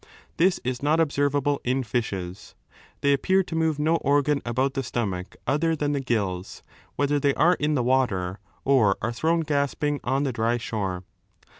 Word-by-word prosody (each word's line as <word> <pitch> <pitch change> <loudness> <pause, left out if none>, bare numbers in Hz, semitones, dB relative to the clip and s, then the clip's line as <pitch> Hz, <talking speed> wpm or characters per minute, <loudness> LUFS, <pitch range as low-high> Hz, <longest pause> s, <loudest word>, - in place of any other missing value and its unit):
This 180 +2 +3
is 125 -1 -3
not 150 +3 +2
observable 145 -2 +1
in 130 +2 0
fishes. 105 -5 -4 0.5
They 140 0 +4
appear 190 +7 +2
to 170 - -6
move 160 -2 +1
no 155 +3 +2
organ 145 0 +2
about 130 +3 0
the 135 - -1
stomach 105 -5 -3
other 155 +5 +1
than 145 -1 -1
the 140 -1 -1
gills^ 100 -7 -2 0.3
whether 145 0 +1
they 140 -1 +1
are 175 +2 +4
in 150 +1 +1
the 125 - +1
water 100 -8 0 0.3
or 120 -8 +4
are 115 - 0
thrown 165 +7 +1
gasping 145 -1 -1
on 135 +3 0
3 - - 0
the - - -4
dry 115 +1 +1
shore. 95 -6 -3
135 Hz, 175 wpm, -25 LUFS, 115-145 Hz, 0.5 s, They